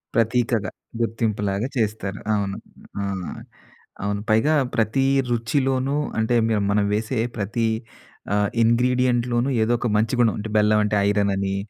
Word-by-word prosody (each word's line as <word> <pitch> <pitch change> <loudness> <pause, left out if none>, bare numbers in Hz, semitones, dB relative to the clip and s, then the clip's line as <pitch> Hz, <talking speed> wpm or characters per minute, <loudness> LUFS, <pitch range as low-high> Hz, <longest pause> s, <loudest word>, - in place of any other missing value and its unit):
ప్రతీకగా, 115 -3 +1 0.3
గుర్తింపులాగా 110 -1 -1
చేస్తారు. 105 -3 -2 0.2
అవును. 100 -1 -2 0.4
ఆ! - - -2 1.0
అవును. 100 0 -1
పైగా 110 +9 +3 0.2
ప్రతీ 115 +4 +1 0.3
రుచిలోనూ 130 +3 0 0.2
అంటే, 110 +2 +1
మీరు 110 -2 +1
మనం 105 0 +2
వేసే 110 +3 -2 0.2
ప్రతీ 110 +3 0 0.7
ఆహ్, 105 0 +2
ఇంగ్రీడియెంట్‌లోనూ 120 +1 +2
ఏదొక 120 +2 +1
మంచి 110 +3 +1
గుణం 115 -4 +4
అంటే, 105 +1 -5
బెల్లవంటే 105 0 +3
ఐరనని, 100 -1 0
110 Hz, 115 wpm, -23 LUFS, 105-120 Hz, 1.0 s, గుణం